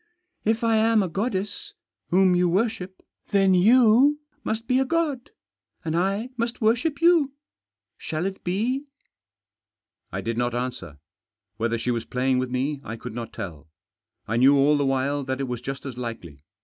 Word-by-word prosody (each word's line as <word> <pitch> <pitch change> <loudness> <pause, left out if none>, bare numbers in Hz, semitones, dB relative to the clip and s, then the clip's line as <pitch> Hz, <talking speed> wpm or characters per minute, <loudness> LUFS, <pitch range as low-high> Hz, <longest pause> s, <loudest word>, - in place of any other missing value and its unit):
" 365 0 -48
If 225 +1 -2
I 225 -1 +3
am 220 -1 +3
a - - -1
goddess, 200 +2 -3 0.3
whom 185 0 +4
you 180 0 +3
worship, 190 -1 -2 0.3
then 195 -2 +4
you 240 +8 +5 0.2
must 225 +1 -3
be 260 +1 +3
god, 295 -4 -1 0.6
and 160 0 -1
I 195 +7 0
must 235 +1 -2
worship 265 +8 +1
you. 330 -6 +4 0.7
Shall 160 +3 -3
it 195 0 -4
be? 235 +10 -1 0.6
" 105 +2 -59
I - - -3
did 115 +1 -3
not 120 0 0
answer. 120 - -4 0.6
Whether 115 +1 0
she 125 +2 -1
was 115 -1 -2
playing 130 0 0
with 130 0 -2
me 135 +3 -2
I 110 - -6
could 115 0 -8
not 115 -1 -6
tell. 80 -6 -8 0.6
I 110 - -1
knew 135 +4 +6
all 140 +2 +4
the 145 -1 +1
while 135 +2 0
that 130 0 -3
it 135 - -2
was 125 -2 -4
just 135 +2 -6
as 125 -3 -6
likely. 90 - -7
180 Hz, 175 wpm, -24 LUFS, -, 0.7 s, knew